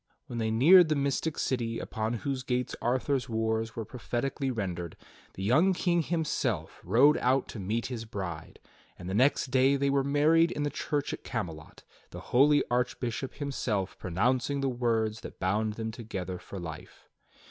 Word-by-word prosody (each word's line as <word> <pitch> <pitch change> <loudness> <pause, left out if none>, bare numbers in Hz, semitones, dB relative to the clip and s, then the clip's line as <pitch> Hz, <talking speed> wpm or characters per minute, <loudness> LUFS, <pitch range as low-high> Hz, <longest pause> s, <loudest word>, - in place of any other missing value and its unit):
When 120 - -5
they 110 -1 0
neared 160 +10 +7
the 155 - +2
mystic 140 +2 -1
city 115 -3 -1
upon 110 +1 -3
whose 135 -2 -1
gates 125 -1 -2
Arthur's 130 +2 0
wars 110 0 -1
were 115 - -4
prophetically 130 +3 -3
rendered, 90 -8 -4 0.4
the 95 - -5
young 155 - +4
King 175 -1 +1
himself 140 - -2
rode 130 - +5
out 130 +1 +2
to 110 - -7
meet 110 +5 -2
his 120 -3 -5
bride; 95 -7 -6 0.4
and 90 - -9
the 95 - -3
next 130 +3 +2
day 135 +1 +4
they 140 0 +1
were 140 -1 +2
married 155 +4 +4
in 145 - -2
the 145 - -1
church 145 -2 -2
at - - -7
Camelot, 85 -10 -6 0.3
the - - -8
holy 145 +3 +5
Archbishop 125 +1 -2
himself 120 -9 -2
pronouncing 125 +9 0
the 135 - +1
words 115 -3 0
that - - -10
bound 105 +4 0
them 110 0 -4
together 95 -6 -5
for 100 - -8
life. 80 -3 -9
120 Hz, 170 wpm, -29 LUFS, 110-140 Hz, 0.4 s, neared